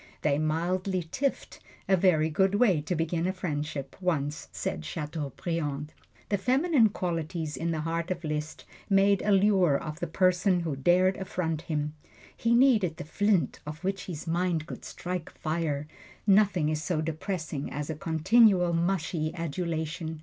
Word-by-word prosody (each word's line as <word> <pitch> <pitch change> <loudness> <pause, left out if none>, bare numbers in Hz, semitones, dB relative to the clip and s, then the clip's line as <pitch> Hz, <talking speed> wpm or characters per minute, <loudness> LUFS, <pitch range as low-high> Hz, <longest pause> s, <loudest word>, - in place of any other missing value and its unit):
They 145 -1 +2
mildly 180 +4 0
tiffed 275 0 -2 0.3
a 195 - +5
very 160 -4 +3
good 190 +5 +2
way 205 -8 +4
to 175 +4 -2
begin 165 +1 0
a - - +1
friendship, 150 -6 -4
once 150 -5 -1
said 75 - -3
Chateaubriand. 150 - -4 0.4
The 205 - +1
feminine 260 - +3
qualities 165 -4 -3
in 165 - -2
the 160 -2 -1
heart 165 +2 -2
of 180 -1 -3
Liszt 150 0 -4 0.2
made 195 0 +4
a 210 - +1
lure 190 -6 +4
of 155 +1 -6
the 175 - -2
person 185 +1 +2
who 160 -4 -2
dared 180 +7 +3
affront 170 -4 -2
him. 150 -2 -2 0.4
He 235 0 +2
needed 220 - +4
the - - -5
flint 205 +2 +1
on 150 - -4
which 195 0 -2
his 165 -3 -6
mind 170 -1 0
could - - -8
strike 180 -2 -5
fire 155 -2 -2 0.4
nothing 195 -6 +4
is 155 0 -1
so 155 0 -1
depressing 160 -2 -3
as 150 +2 -3
continual, 180 +3 +4
mushy 165 -2 0
adulation. 160 -1 -3
170 Hz, 150 wpm, -28 LUFS, 155-190 Hz, 0.4 s, a